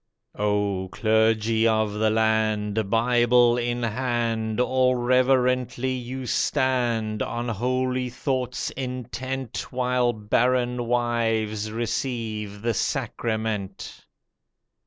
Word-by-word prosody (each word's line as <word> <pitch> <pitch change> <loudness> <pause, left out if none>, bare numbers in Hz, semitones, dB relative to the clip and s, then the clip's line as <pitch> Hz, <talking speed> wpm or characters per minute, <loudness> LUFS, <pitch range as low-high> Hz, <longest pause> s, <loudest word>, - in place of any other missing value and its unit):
Oh, 105 -2 -1
clergy 110 0 +2
of 110 -2 +1
the 110 +1 +1
land, 110 -1 +1
Bible 120 +1 +4
in 120 0 -1
hand, 115 -2 -1
All 130 0 +3
reverently 125 0 +2
you 130 +1 -5
stand, 120 -5 0
On 120 +1 -3
holy 125 +3 -1
thoughts 125 0 -2
intent 130 -1 -5
While 125 -1 +1
barren 120 +2 0
wives 115 -3 0
receive 110 -3 -3
the 115 0 +1
sacrament! 110 -3 -3
120 Hz, 90 wpm, -25 LUFS, 110-125 Hz, -, Bible